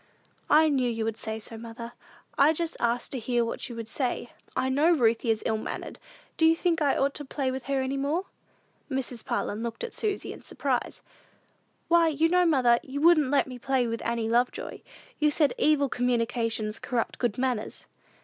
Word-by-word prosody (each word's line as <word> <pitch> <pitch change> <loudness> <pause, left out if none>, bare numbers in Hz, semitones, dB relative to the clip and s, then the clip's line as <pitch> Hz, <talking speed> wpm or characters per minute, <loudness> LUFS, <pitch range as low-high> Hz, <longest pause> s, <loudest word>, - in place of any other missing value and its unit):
"I 315 +1 +6
knew 260 -4 +1
you 225 -1 -2
would 225 -1 -1
say 220 0 -4
so, 220 +1 -5
mother. 230 +1 -8 0.4
I 295 +3 +5
just 330 0 -3
asked 235 +1 0
to 265 - -2
hear 240 0 0
what 230 - -4
you 240 - -7
would 230 -1 -6
say. 245 0 -2 0.2
I 260 - +1
know 285 +5 +3
Ruthie 235 -6 +2
is 220 -1 +1
ill 220 - +1
mannered: - - -6 0.4
do 320 - +4
you 325 - +5
think 330 -1 0
I 285 -2 +2
ought 275 +1 +1
to 295 - -6
play 270 -1 -2
with 260 -1 -5
her 275 -1 0
any 265 +1 -2
more?" 300 +7 -1 0.6
Mrs. 260 -4 -3
Parlin 230 -3 -2
looked 235 - -4
at 475 - -5
Susy 415 -2 -2
in - - -12
surprise. - - -2 0.8
"Why, 335 -1 +5
you 320 +1 +2
know, 360 0 +4
mother, 250 -6 +4
you 275 +2 -6
wouldn't 310 -3 +5
let 285 0 +3
me 255 -2 -9
play 265 0 +1
with 230 0 -3
Annie 230 -1 -1
Lovejoy. 240 +2 0 0.4
You 300 - +4
said, 295 -3 +2
'evil 295 -2 +3
communications 230 -3 -1
corrupted 240 -3 -2
good 240 -5 0
manners.'" 250 -4 -2
255 Hz, 195 wpm, -27 LUFS, 230-295 Hz, 0.8 s, I